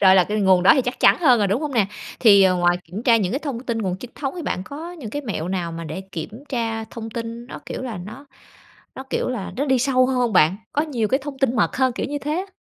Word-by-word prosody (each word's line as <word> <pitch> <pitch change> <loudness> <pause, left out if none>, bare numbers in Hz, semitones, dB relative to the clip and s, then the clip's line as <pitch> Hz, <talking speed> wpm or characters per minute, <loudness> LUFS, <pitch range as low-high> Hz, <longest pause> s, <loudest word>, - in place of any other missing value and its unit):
Rồi 190 -1 +7
là 185 - +5
cái 210 +2 -2
nguồn 190 -2 +4
đó 185 - +8
thì 265 - +2
chắc 250 +1 -4
chắn - - +6
hơn 255 -7 +5
rồi, 205 - +2
đúng 230 +10 0
hông 295 - -3
nè? 220 -5 +3 0.3
Thì, 200 -4 +7
ờ, 185 -1 +4
ngoài 175 0 +3
kiểm 185 +7 -7
tra 235 -2 +5
những 195 -5 0
cái 270 - 0
thông 280 -6 -4
tin 235 -3 -3
nguồn 185 -4 -2
chính 245 +5 -10
thống 270 +1 -4
thì 345 - -5
bạn 185 - -2
có 320 +7 -8
những 275 -11 -8
cái 290 +6 -4
mẹo 190 - -4
nào 175 -3 -2
mà 165 0 -6
để 155 +4 -5
kiểm 215 - -7
tra 225 -3 -2
thông 225 0 -8
tin 230 +1 -6
nó, - - -8
kiểu - - -5
là, 235 -7 -5
nó 220 +10 -10 0.7
nó, 265 - -7
kiểu - - -1
là, 235 -7 -4
nó 280 - 0
đi 265 -2 +3
sâu 255 0 +3
hơn 265 - -1
hông 245 -2 +1
bạn? 180 0 +4 0.2
Có 295 - +1
nhiều 250 -9 -1
cái 265 +4 +1
thông 280 -1 -7
tin 255 -2 +1
mật 210 - +1
hơn, 260 -1 +2
kiểu - - -3
như 290 0 -3
thế 295 +1 -3
á. 380 +4 -3
235 Hz, 295 wpm, -22 LUFS, 195-265 Hz, 0.7 s, đó